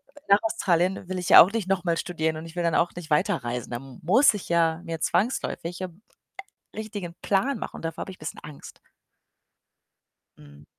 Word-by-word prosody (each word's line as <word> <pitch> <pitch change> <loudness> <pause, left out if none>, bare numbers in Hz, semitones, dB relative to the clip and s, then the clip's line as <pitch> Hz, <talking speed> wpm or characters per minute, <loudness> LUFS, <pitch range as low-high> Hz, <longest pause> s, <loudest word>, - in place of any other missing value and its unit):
äh, - - -14
nach 200 +1 +7
Australien 185 -4 0
will 185 - -3
ich 180 - -4
ja - - +11
auch 180 - +5
nicht 220 -4 -2
noch 190 -2 0
mal 170 -2 0
studieren 160 -3 -2
und 160 - -8
ich 165 +1 -11
will 175 - -1
dann 170 -1 +1
auch 170 - +2
nicht 175 -2 -8
weiterreisen. 125 -5 -1
Da 120 - -2
m 135 0 -12
muss 220 - +5
ich 205 - -7
ja 165 -1 +2
mir 165 -1 -4
zwangsläufig 180 -6 -1
'n, 185 +1 -7 0.7
äh, - - -9
richtigen 205 -6 -6
Plan 240 +6 +1
machen - - -6
und - - -11
davor 165 0 -4
habe - - -7
ich - - -13
'n - - -46
bisschen 155 - -6
Angst. 150 -2 -12 1.6
Mhm. 70 0 -16
175 Hz, 210 wpm, -25 LUFS, 160-195 Hz, 1.6 s, ja